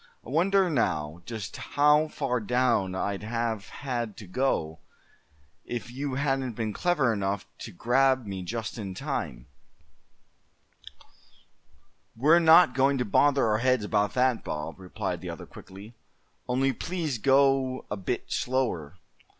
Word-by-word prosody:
"I - - -10
wonder, 190 +5 +3
now, 85 - -1
just 110 -6 -6
how 150 +2 +3
far 135 -5 -2
down 115 -4 +1
I'd 100 +1 -2
have 115 -1 -3
had 120 -6 -4
to 105 - -9
go, 90 - -1 0.8
if 120 0 -6
you 135 +1 -4
hadn't 135 -3 -1
been 110 -1 -3
clever 150 - +1
enough 100 -1 -2
to 110 - -7
grab 130 +5 +2
me 95 -2 -5
just 115 +5 -5
in 95 -3 -5
time?" 80 - -4 2.7
"We're 150 +9 +5
not 165 -3 +7
going 135 +1 +2
to 125 - -1
bother 140 +6 +3
our 110 -1 +2
heads 125 -3 +2
about 105 -1 0
that, 125 -2 +2
Bob," 75 +4 -5
replied 90 -1 -4
the - - -6
other, - - -7
quickly; 100 +4 -12 0.5
"only 130 +2 +1
please 160 -3 -3
go 135 0 +3
a - - 0
bit 95 -3 -4
slower. 95 - -1
120 Hz, 135 wpm, -27 LUFS, 100-135 Hz, 2.7 s, not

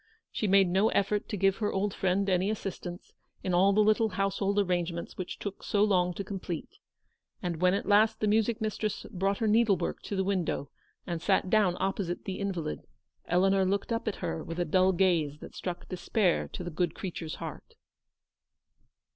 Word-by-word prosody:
She 215 - -1
made 195 -1 +5
no 190 +5 +3
effort 205 +1 0
to 210 - -2
give 195 0 +2
her 210 -2 -1
old 195 +1 -1
friend 195 +1 +1
any 185 +1 +2
assistance 190 -4 -5 0.3
in 185 - -1
all 190 +3 +5
the 210 +2 +4
little 215 +1 +3
household 195 0 -1
arrange 180 -3 +1
ments 170 0 -6
which 185 - -5
took 200 -1 -6
so 205 0 +1
long 180 -4 +2
to 200 - -3
complete, 185 -4 -6 0.6
and 170 -2 -3
when 180 +1 +4
at - - -2
last 215 +2 +4
the - - 0
music 220 +2 +2
mistress 215 -1 -2
brought 195 +1 0
her 225 - -1
needle 215 -2 +4
work - - -3
to 205 - -5
the 190 - +1
window, 185 -7 -1 0.3
and 170 -3 -3
sat 190 0 +1
down 200 -5 +3
opposite 190 -2 -2
the 190 - -4
invalid, 180 - -3 0.4
Eleanor 195 +2 +3
looked 195 +4 -1
up 230 0 -3
at 215 - 0
her 160 - -3
with 165 - -6
a 175 - +1
dull 185 +3 +4
gaze 170 -6 +2
that - - -11
struck 175 -1 -5
despair 185 +1 0
to - - -7
the 175 - -5
good 170 0 -1
creature's 170 -4 -5
heart. - - -8
195 Hz, 190 wpm, -29 LUFS, 180-205 Hz, 0.6 s, made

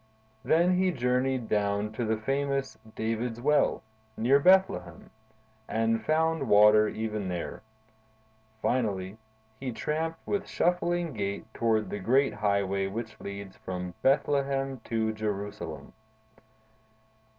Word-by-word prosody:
Then 175 +3 +3
he 185 0 +3
journeyed 125 -3 0
down 105 0 0
to 115 +2 -3
the 110 -1 0
famous 135 +3 -1 0.2
David's 115 +1 -2
Well, 150 0 +2 0.3
near 130 +5 +4
Bethlehem, 140 - +2 0.6
and 115 0 0
found 160 -3 +1
water 105 +1 +7
even 110 -2 -3
there. 90 -2 -4 1.0
Finally, 100 -4 -1 0.4
he 130 -1 -3
tramped 160 +7 -2
with 205 -1 -2
shuffling 175 -2 0
gait 100 -2 -3
toward 110 -2 +1
the 105 - -3
great 130 +8 +2
highway 100 -2 0
which 110 +3 -6
leads 100 -1 -7
from 90 -1 -5
Bethlehem 135 -1 +1
to 110 -1 0
Jerusalem. 105 -2 -5
115 Hz, 110 wpm, -28 LUFS, 105-140 Hz, 1.0 s, water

